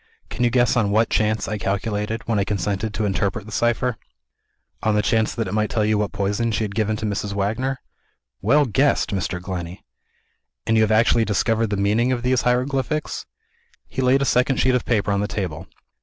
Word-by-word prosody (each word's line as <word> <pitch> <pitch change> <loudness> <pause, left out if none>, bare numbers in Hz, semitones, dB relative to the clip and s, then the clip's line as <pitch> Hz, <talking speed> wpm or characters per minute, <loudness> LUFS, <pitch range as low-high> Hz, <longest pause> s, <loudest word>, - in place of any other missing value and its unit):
Can - - -2
you 120 - +4
guess 120 -1 +2
on 110 -4 +2
what 110 +2 +2
chance 110 0 +1
I 105 -1 -3
calculated, 105 +2 -2
when 110 -3 +1
I - - +2
consented 100 +2 -2
to 110 - -1
interpret 100 +2 -1
the 110 - -10
cipher?" 120 +1 0 0.8
"On 110 -1 +1
the 105 - +2
chance 110 -1 +1
that 115 -3 -2
it 90 - -4
might 105 0 +1
tell 110 -2 0
you 105 -1 +2
what 105 -1 -1
poison 105 +4 -1
she 110 - -1
had 100 -2 -4
given 110 0 0
to 110 - -4
Mrs. 105 -1 -2
Wagner?" 110 +7 -1 0.6
"Well 145 +9 +4
guessed, 135 +4 +1
Mr. 95 -2 -2
Glenney!" 90 -1 -6 0.8
"And 115 - +2
you 110 - +4
have 110 0 +2
actually 115 +1 +4
discovered 110 +2 +1
the 100 -1 -2
meaning 110 +5 +2
of 120 -2 -1
these 125 -1 +2
hieroglyphics?" 135 +4 -1 0.6
He 130 - -4
laid 130 +2 +3
a - - 0
second 125 +1 +2
sheet 130 - +3
of 125 - 0
paper 105 -3 +1
on 100 - +1
the 105 - -1
table. 90 -5 -4
110 Hz, 205 wpm, -22 LUFS, 100-120 Hz, 0.8 s, you